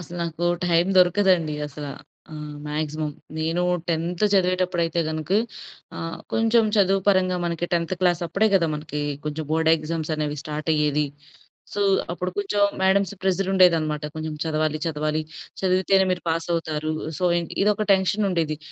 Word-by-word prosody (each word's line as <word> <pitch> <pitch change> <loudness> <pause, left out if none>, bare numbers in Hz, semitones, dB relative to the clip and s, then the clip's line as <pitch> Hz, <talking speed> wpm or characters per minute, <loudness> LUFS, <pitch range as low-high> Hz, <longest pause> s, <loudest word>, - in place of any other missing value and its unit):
అసలు 175 0 -9
నాకు 170 0 -3 0.2
టైం 170 0 +3
దొరకదండి 180 -3 +3
అసల. 150 0 -8 0.5
ఆహ్, 150 -1 -7
మ్యాక్సిమమ్. 150 0 -3 0.2
నేను 165 +3 0 0.3
10థ్ 170 +3 -1
చదివేటప్పుడు 185 -2 +2
అయితే 165 +1 -1
గనుక 155 +1 -4 0.7
ఆహ్, 165 0 -5
కొంచెం 225 0 +3
చదువు 195 -1 +3
పరంగా 185 -2 +3
మనకి 170 0 -2
10థ్ 170 +1 0
క్లాస్ 175 -2 +2
అప్పుడే 195 +6 +1
కదా! 175 -3 +4
మనకి 150 0 -5 0.2
కొంచెం 150 +1 -3
బోర్డ్ 160 0 +2
ఎగ్జామ్స్ 160 0 -4
అనేవి 150 -1 -2
స్టార్టయ్యేది. 150 -1 0 0.7
సో, 205 - -3 0.3
అప్పుడు 180 +1 -3
కొంచెం 205 0 0 0.2
మేడమ్‌స్ 195 +1 +3
ప్రెషర్ 190 0 0
ఉండేది 185 -3 +6
అన్నమాట. 150 -1 -3
కొంచెం 155 0 -4
చదవాలి, 155 -1 0
చదవాలి 155 0 -1 0.4
చదివితేనే 190 +1 +3
మీరు 180 - -1
పాసవుతారు. 160 -2 -1 0.3
సో, 180 - -1
ఇన్ 170 - -3 0.2
ఇదొక 210 +1 +2
టెన్షన్ 195 +2 +2
ఉండేది. 160 -4 0
170 Hz, 145 wpm, -24 LUFS, 155-185 Hz, 0.7 s, ఉండేది